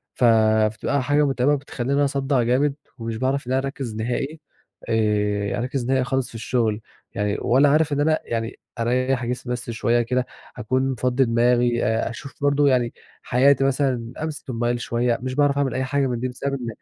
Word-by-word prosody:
ف - - -2
فبتبقى 110 +3 +3
حاجة 145 +3 +2
متعِبة 135 +1 +2
وبتخلّيني 140 0 -1
أصدّع 135 -2 0
جامد 135 +4 +2 0.2
ومش 115 -1 -4
باعرَف 130 +2 -1
إن - - -3
أنا 130 - +2
أركّز 135 -4 -5
نهائي 125 +7 -3 0.5
آآ، 105 -2 +1
أركّز 125 +1 -2
نهائي 130 +1 +2
خالص 130 0 -1
في - - -14
الشغل 115 -1 -1 0.3
يعني 105 0 -1
ولا 135 +4 +4
عارف 150 0 +3
إن 145 - 0
أنا 155 +1 +2
يعني 115 -1 -4 0.2
أريّح 125 +2 0
جسمي 125 0 -3
بس 120 -1 -5
شوية 115 +1 +1
كده 125 +2 0 0.3
أكون 130 +4 0
مفضّي 125 +1 +1
دماغي، 120 0 +2
أشوف 115 +4 -2
برضه 145 0 +3
يعني 125 -3 +2 0.3
حياتي 135 +2 +3
مثلًا، 130 -3 0
أمسِك 155 -3 -5
الموبايل 120 0 -1
شوية، 120 0 0
مش 130 0 -4
باعرَف 145 -1 +2
أعمل 140 -3 0
أي 130 - -1
حاجة 135 +1 0
من 120 -2 -2
دي 130 - -1
بسبب 135 +2 -4
إن 130 -3 -4
125 Hz, 180 wpm, -23 LUFS, 115-135 Hz, 0.5 s, ولا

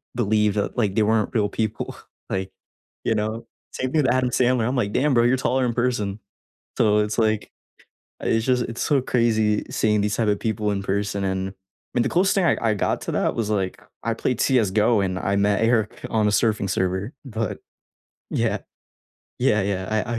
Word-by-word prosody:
believe 105 -3 +2
that, 105 +3 -2
like, 105 -5 +1
they 110 - +3
weren't 110 0 +1
real 105 -4 +1
people, 110 0 -3 0.3
like, 95 0 -2 0.5
you 115 - +2
know, 110 +2 -3 0.2
same 130 0 -3
thing 155 -1 +2
with 125 - +3
Adam 130 -1 +1
Sandler, 125 -2 +2
I'm 130 - -1
like, 105 -5 0
"Damn, 145 +2 +2
bro, 120 -1 +4
you're 125 +2 +3
taller 130 0 +1
in 120 - 0
person." 110 -4 -1 0.6
So 105 0 +4
it's 105 +2 0
like 110 -1 +1 0.7
it's 115 0 +1
just 125 -2 +2
it's 115 0 -5
so 140 -3 +2
crazy 110 -4 +1
seeing 105 -1 +1
these 105 +1 0
type 115 -2 +1
of 105 -1 +1
people 105 -2 -1
in 100 -1 -2
person, 100 0 -1
and 95 0 -1
I - - -19 0.5
mean, - - +4
the - - 0
coolest 190 +3 +3
thing 195 -3 +2
I 160 - +3
I 115 -2 +2
got 100 - -1
to - - -4
that - - 0
was, 110 -2 -1
like, 95 -3 -1 0.2
I 115 - 0
played 125 +2 -2
CS:GO 110 -3 +3
and 95 -1 -1
I 100 +1 0
met 100 +1 +2
Eric 115 -2 +1
on 110 -2 +2
a - - +2
surfing 105 -2 +1
server, 95 +5 -1
but 110 -5 -3 0.7
yeah. - - 0 0.8
Yeah, 105 -1 +3
yeah, 95 -1 -2
I 110 +2 -1
110 Hz, 200 wpm, -23 LUFS, 100-120 Hz, 0.8 s, bro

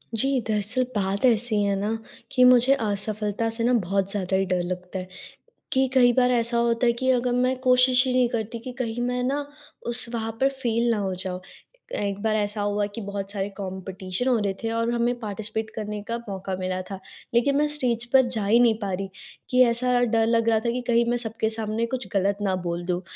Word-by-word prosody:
जी। 270 +4 +1
दरअसल 215 +4 +1
बात 200 +3 0
ऐसी 225 -3 +3
है 200 0 +1
ना 205 +2 -1 0.4
कि 255 -2 +4
मुझे 250 +1 +6
असफलता 210 -1 -1
से 230 - -1
ना 245 - +3
बहुत 195 -3 0
ज़्यादा 190 -2 -1
ही 195 0 +2
डर 180 -1 0
लगता 180 +1 -5
है। 185 - -7 0.7
कि 265 0 +3
कई 245 -2 +5
बार 250 0 +3
ऐसा 235 -1 +2
होता 235 +1 +2
है 235 - +4
कि 260 - +1
अगर 250 -1 +1
मैं 255 +1 +1
कोशिश 255 0 +5
ही 255 - 0
नहीं 250 -1 +3
करती 230 0 -3
कि 250 +3 -7
कहीं 235 0 -3
मैं 250 0 -1
ना 280 +3 -1 0.4
उस 240 0 -2
वहाँ 225 -1 -2
पर 270 - +5
फेल 240 -3 -1
ना 225 - +1
हो 195 -2 -2
जाऊँ। 180 0 -5 0.6
एक 200 0 -2
बार 220 -1 +1
ऐसा 210 0 -1
हुआ 205 0 0
कि 230 - -5
बहुत 200 -1 -5
सारे 200 -1 -3
कॉम्पिटिशन 190 +2 -4
हो 250 -2 +3
रहे 200 -2 -1
थे 225 - 0
और 230 0 0
हमें 240 +1 0
पार्टिसिपेट 220 0 -4
करने 210 -1 -4
का 230 - -2
मौका 190 -1 -4
मिला 185 0 -2
था। 195 -1 -6 0.3
लेकिन 245 +4 +3
मैं 300 +1 +3
स्टेज 250 -6 0
पर 265 -1 +6
जा 230 -4 -2
ही 220 +4 +4
नहीं 235 -2 +5
पा 200 -3 -3
रही, 195 +1 -3 0.4
कि 250 0 +4
ऐसा 245 +1 +2
डर 225 -1 +2
लग 230 0 +2
रहा 220 -1 +3
था 235 - +2
कि 250 +1 -2
कहीं 235 0 +3
मैं 240 - +1
सबके 225 -1 -1
सामने 220 0 -2
कुछ 250 -1 -4
गलत 200 0 +1
ना 190 -2 +1
बोल 175 0 -3
दूँ 180 0 -1
225 Hz, 220 wpm, -25 LUFS, 200-245 Hz, 0.7 s, मुझे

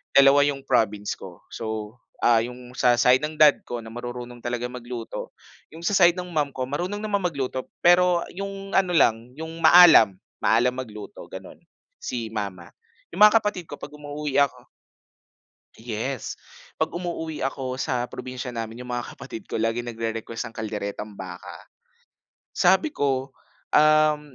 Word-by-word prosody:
dalawa 140 +1 +7
yung 145 -1 0
province 105 -5 +1
ko, - - -11
so, 110 0 -5 0.2
ah, 115 -1 +4
yung 125 +1 -9
sa 120 -1 +3
side 125 +3 +5
ng 155 0 -4
dad 150 -2 +6
ko 120 - -5
na 115 - -10
marurunong 120 +1 -7
talagang 120 +1 -3
magluto, 120 -1 -7 0.4
yung 165 +2 -6
sa 205 - +2
side 175 -1 +5
ng 180 - -5
mom 145 -2 +1
ko 130 -1 -4
marunong 180 +9 -3
naman 205 -3 -1
magluto 135 -6 -3
pero 175 0 +4
yung 195 0 -6
ano 185 -2 +3
lang, 115 -7 +2
yung 160 0 -6
maalam, 160 - +8 0.2
maalam 125 +3 +3
magluto, 110 - -8
ganon, - - -10 0.4
si 115 -2 -4
mama, 95 -5 -5 0.4
yung - - -7
mga 210 +1 +9
kapatid 195 -5 -3
ko - - -8
'pag - - -9
umuuwi 150 -1 -6
ako 140 - -1 1.1
yes, 115 +3 -5 0.4
pag - - -1
umuuwi 170 -3 -4
ako 130 -1 -3
sa 125 -4 -1
probinsya 125 0 -7
namin, 115 +2 -6
yung 125 - -5
mga 120 -1 -4
kapatid 110 - -9
ko - - -2
laging 115 +2 -1
nagrerequest 115 +1 -4
ng 115 - -9
kalderetang 105 -1 -5
baka, 90 -2 -9 0.9
sabi 190 - +3
ko, 135 - -1 0.4
um, 150 -2 +3
125 Hz, 155 wpm, -24 LUFS, 115-155 Hz, 1.1 s, mga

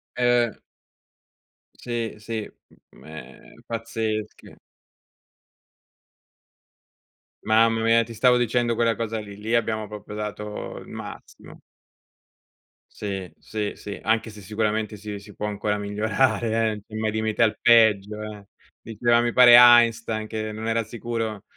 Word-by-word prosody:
Eh. 120 -1 +2 1.2
Sì, 120 -2 -4
sì, 110 0 -5 0.4
mhmm, - - -19
ehm, 80 0 -12
pazzesche. 110 -2 -5 2.9
Mamma 115 +1 +3
mia 115 0 +4
ti 115 - -10
stavo 125 +3 +4
dicendo 120 0 +1
quella 115 0 +1
cosa 115 -1 -3
lì, 100 -1 -10
lì 110 +3 -2
abbiamo 110 -2 -1
proprio 105 0 -9
dato 105 0 -6
il - - -13
massimo. - - -11 1.3
Sì, 95 -3 -6
sì, 105 -1 -4
sì, 100 - -8
anche 110 +1 0
se 105 - -12
sicuramente 105 +1 -2
si 105 0 -7
si 100 0 -15
può 105 - -4
ancora 105 0 -2
migliorare 110 +1 0
eh, 110 - -11
mai 110 -1 -1
limite 110 +1 0
al 110 - +1
peggio, 105 -3 +4
eh. 105 -2 -9 0.3
Diceva 120 +2 +1
mi 120 0 0
pare 120 -1 +8
Einstein 115 -2 +5
che 110 -1 -4
non 110 +1 -6
era 115 0 +1
sicuro 115 -2 -5
110 Hz, 125 wpm, -24 LUFS, 105-115 Hz, 2.9 s, pare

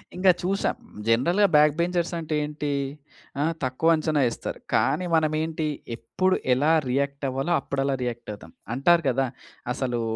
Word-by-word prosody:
ఇంక 185 +2 0
చూసా. 195 +2 0 0.4
జనరల్‌గా 170 - +3
బ్యాక్ 150 -1 +6
బెంచర్స్ 175 0 0
అంటే 155 -1 -3
ఏంటీ, 150 0 -3 0.7
ఆ! - - +2 0.2
తక్కువ 140 +6 +2
అంచనా 155 -2 0
ఏస్తారు. - - -6
కానీ 180 +4 +2
మనం 155 -1 +2
ఏంటి 160 -1 -2 0.3
ఎప్పుడు 185 +11 0 0.2
ఎలా 145 +5 +2 0.2
రియాక్ట్ 140 +2 -1
అవ్వాలో 135 +6 -2
అప్పుడు 135 0 -3
అలా 135 0 0
రియాక్ట్ 120 -2 -5
అవుతాం. 105 - -12 0.2
అంటారు 170 +6 +4
కదా! 135 +1 +1 0.5
అసలూ 120 -3 -2
150 Hz, 150 wpm, -25 LUFS, 135-165 Hz, 0.7 s, బ్యాక్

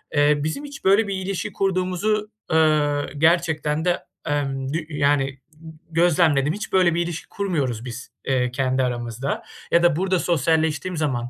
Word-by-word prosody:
eee, 145 +1 +4
bizim 155 - -3
hiç 285 -1 -10
böyle 200 +3 +4
bir 200 - -2
ilişki 190 0 -3
kurduğumuzu, 195 +3 0 0.2
eee, 150 -3 +2
gerçekten 160 -1 +2
de, 180 -1 +2 0.3
emm, 135 -3 -1
g 150 +5 -1
y 150 -2 -5
yani, 140 -1 +3 0.3
g 160 +1 -13 0.2
gözlemledim. 160 -4 +3
Hiç 210 - -6
böyle 180 -3 +4
bir 170 - +1
ilişki 170 -1 -6
kurmuyoruz 140 - -2
biz, 125 +1 -8
eee, 125 -2 +1
kendi 130 0 0
aramızda 120 +1 -3 0.3
ya 170 - +4
da 170 -3 +4
burada 185 +2 +1
sosyalleştiğim 160 +1 0
zaman, 130 -6 -1
155 Hz, 160 wpm, -23 LUFS, 140-180 Hz, 0.3 s, eee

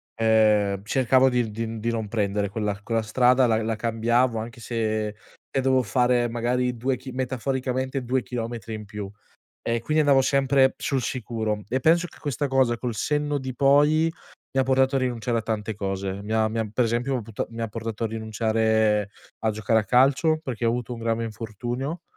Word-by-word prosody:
ehm, 105 -3 +3
cercavo 130 +2 +3
di 120 -3 0
di 115 +1 -4
di 115 +2 -1
non 110 -2 -3
prendere 100 -2 -1
quella 105 -1 -2
quella 115 -1 0
strada, 125 +3 +4
la 110 0 +2
la 110 0 -1
cambiavo 115 +2 +1
anche 115 +1 -7
se 110 -2 -1 0.5
e 135 - +1
dovevo 130 -1 +3
fare 120 +3 +2
magari 125 +1 -1
2 130 +2 0
chi 130 0 -9
metaforicamente 130 +1 -2
2 130 +1 0
chilometri 115 -2 -5
in 105 -1 -8
più. 100 -1 -6 0.6
E 115 0 +1
quindi, 155 +5 +1
andavo 140 -2 +5
sempre 135 -1 +3
sul 135 -3 -1
sicuro. 110 -4 -3
E 130 +2 0
penso 170 +5 +3
che - - -17
questa 145 0 -2
cosa, 130 -3 +2
col 120 -2 -3
senno 150 +3 0
di 130 -1 -5
poi, 145 +4 +4 0.5
mi 135 - +2
ha - - +4
portato 130 +1 +2
a 135 - +2
rinunciare 120 -2 -1
a - - -2
tante 110 -1 -3
cose. 95 0 -3
Mi 105 - -8
ha 110 0 +3
mi 110 +1 -2
ha 110 -2 -3
per 125 +2 +2
esempio, 120 +3 0
puta 110 -1 -4
mi 115 0 -8
ha - - 0
portato 115 +1 -5
a - - +2
rinunciare 110 -1 +1 0.3
a 110 - +1
giocare 110 +1 +1
a - - -5
calcio, 140 +6 +3
perché 125 -7 -4
ho 115 - +4
avuto 120 +1 -2
un 115 - -6
grave 115 0 -1
infortunio 120 - -5
115 Hz, 190 wpm, -25 LUFS, 110-130 Hz, 0.6 s, andavo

